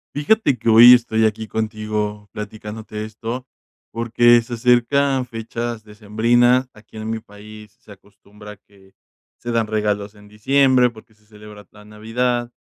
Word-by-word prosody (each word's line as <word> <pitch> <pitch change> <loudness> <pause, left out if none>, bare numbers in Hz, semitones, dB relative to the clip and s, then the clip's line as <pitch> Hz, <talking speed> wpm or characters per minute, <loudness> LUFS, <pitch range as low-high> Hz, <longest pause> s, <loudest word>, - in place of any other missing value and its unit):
Fíjate 145 - +1
que - - -8
hoy 115 +2 +9
estoy 110 -2 +2
aquí 110 0 -2
contigo 105 -1 -4
platicándote 105 0 -8
esto, 115 +4 -7 0.4
porque 120 +1 +3
se 120 +1 -7
acercan 130 +3 +1
fechas 115 -1 -6
decembrinas. 115 +4 +1
Aquí 105 +1 -17
en 110 0 -6
mi 115 0 -3
país, 105 +1 -15
se 105 - -15
acostumbra 105 +1 -16
que 95 -1 -24 0.5
se 120 - -6
dan 115 -2 0
regalos 105 -1 -2
en 105 0 -18
diciembre 130 +4 +2
porque 110 -1 -17
se 105 0 -32
celebra 105 -1 -14
la 105 0 -17
Navidad. 120 +3 -3
110 Hz, 140 wpm, -20 LUFS, 105-120 Hz, 0.5 s, hoy